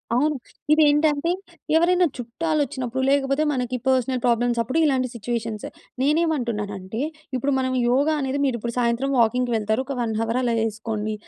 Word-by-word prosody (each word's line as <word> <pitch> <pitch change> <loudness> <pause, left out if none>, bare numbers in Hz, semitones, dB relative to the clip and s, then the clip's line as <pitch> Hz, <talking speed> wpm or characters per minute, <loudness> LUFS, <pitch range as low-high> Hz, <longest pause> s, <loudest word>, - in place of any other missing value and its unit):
అవును. 295 +3 +2 0.4
ఇదేంటంటే, 300 +1 +3 0.5
ఎవరైనా 360 +1 +4
చుట్టాలొచ్చినప్పుడు, 260 -1 -2
లేకపోతే 275 +1 +2
మనకి 250 -2 -2
పర్సనల్ 255 -1 +1
ప్రాబ్లమ్సప్పుడు 240 +3 +1
ఇలాంటి 260 -3 +2
సిచ్యువేషన్స్. 225 -1 -3 0.4
నేనేమంటున్నానంటే, 235 - -1 0.3
ఇప్పుడు 275 +3 0
మనం 260 0 -1 0.2
యోగా 285 +5 +3
అనేది 270 +1 -1
మీరిప్పుడు 235 -2 -2
సాయంత్రం 240 +3 +1
వాకింగ్‌కి 245 +2 +2
వెళ్తారు. 220 +3 0
ఒక 275 - -4
1 225 -2 -1
హవర్ 230 +2 0
అలా 240 -2 +1
యేసుకోండి. 215 -1 -2
250 Hz, 130 wpm, -23 LUFS, 230-285 Hz, 0.5 s, ఎవరైనా